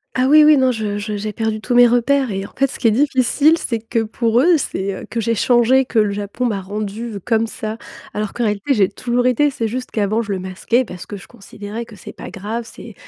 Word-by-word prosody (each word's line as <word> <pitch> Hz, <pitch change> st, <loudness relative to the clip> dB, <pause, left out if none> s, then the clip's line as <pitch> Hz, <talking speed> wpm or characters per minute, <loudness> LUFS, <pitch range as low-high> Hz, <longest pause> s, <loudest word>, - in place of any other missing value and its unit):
Ah 255 Hz, 0 st, +2 dB
oui, 305 Hz, +1 st, +7 dB
oui, 300 Hz, -1 st, +6 dB
non, 260 Hz, -1 st, +3 dB
je 210 Hz, -3 st, -3 dB
je 210 Hz, 0 st, -4 dB
j'ai 210 Hz, +1 st, -4 dB
perdu 220 Hz, 0 st, -2 dB
tous 245 Hz, -, -2 dB
mes 245 Hz, 0 st, +7 dB
repères 250 Hz, +1 st, +2 dB
et 195 Hz, 0 st, -3 dB
en -, -, -12 dB
fait, 275 Hz, -, +3 dB
ce -, -, -8 dB
qui 230 Hz, -, +3 dB
est -, -, +2 dB
difficile, 280 Hz, +5 st, +3 dB
c'est 230 Hz, -7 st, -3 dB
que 225 Hz, +1 st, -2 dB
pour 230 Hz, +2 st, +1 dB
eux, 340 Hz, +3 st, +5 dB
c'est, 195 Hz, -8 st, -3 dB
heu, -, -, -8 dB
que 230 Hz, -, -2 dB
j'ai 230 Hz, +1 st, 0 dB
changé, 245 Hz, +3 st, +3 dB
que 230 Hz, -3 st, 0 dB
le 210 Hz, -1 st, +2 dB
Japon 205 Hz, +4 st, -4 dB
m'a 210 Hz, -5 st, -1 dB
rendue 210 Hz, +3 st, -5 dB
comme 225 Hz, -1 st, +1 dB
ça. 220 Hz, -1 st, -5 dB, 0.4 s
Alors 210 Hz, -1 st, -3 dB
qu'en 240 Hz, -, -2 dB
réalité, 210 Hz, +5 st, 0 dB
j'ai 200 Hz, -6 st, +3 dB
toujours 245 Hz, 0 st, -1 dB
été, 255 Hz, +4 st, +3 dB
c'est 230 Hz, -5 st, -3 dB
juste 250 Hz, +3 st, -5 dB
qu'avant 215 Hz, +1 st, 0 dB
je 205 Hz, -3 st, -4 dB
le 190 Hz, -, -3 dB
masquais 190 Hz, +7 st, 0 dB
parce 180 Hz, -6 st, -9 dB
que 205 Hz, -, -8 dB
je 195 Hz, -, -11 dB
considérais 210 Hz, 0 st, -8 dB
que 225 Hz, -2 st, -14 dB
c'est -, -, -10 dB
pas -, -, -10 dB
grave. 215 Hz, +4 st, -5 dB
C'est 225 Hz, -, -11 dB
225 Hz, 250 wpm, -19 LUFS, 210-250 Hz, 0.4 s, oui